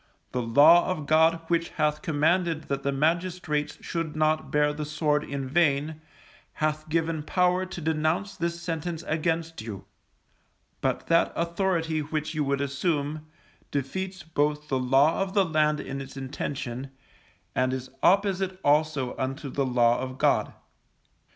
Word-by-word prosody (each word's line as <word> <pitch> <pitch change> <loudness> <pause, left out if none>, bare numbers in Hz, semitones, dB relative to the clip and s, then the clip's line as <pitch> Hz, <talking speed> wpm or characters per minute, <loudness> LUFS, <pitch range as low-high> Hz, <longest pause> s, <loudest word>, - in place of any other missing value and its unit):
The 125 - -1
Law 145 +9 +6
of 170 -5 -2
God 160 +2 +4
which 170 0 +1
hath 150 -1 +1
commanded 160 0 +1
that 140 -1 -1
the 140 - 0
magistrates 160 0 -1
should 165 -3 -3
not 155 0 +1
bear 150 0 +2
the 150 +1 -4
sword 150 -1 0
in 140 -1 -4
vain, 150 +1 +1 0.5
hath 155 0 -2
given 165 -1 0
power 180 +3 +1
to 185 - -7
denounce 160 +5 0
this 170 0 -2
sentence 170 -1 -4
against 165 0 -1
you; 110 -3 -7 1.0
but - - -1
that 170 0 +3
authority 170 -2 0
which 155 +1 -3
you 155 -1 0
would 140 0 0
assume, 145 +2 -2 0.4
defeats 185 +7 -3
both 150 -1 -1
the 130 - +1
law 135 +7 +3
of 195 +1 -2
the 200 -2 +4
land 150 -2 +2
in 135 +1 -5
its 135 0 -9
intention, 135 -1 -4 0.6
and 130 0 +1
is 130 0 -5
opposite 190 -1 +2
also 145 -3 +2
unto 135 +1 -3
the 140 -1 0
Law 120 -1 +3
of 130 0 -5
God. - - +2
155 Hz, 145 wpm, -27 LUFS, 140-170 Hz, 1.0 s, Law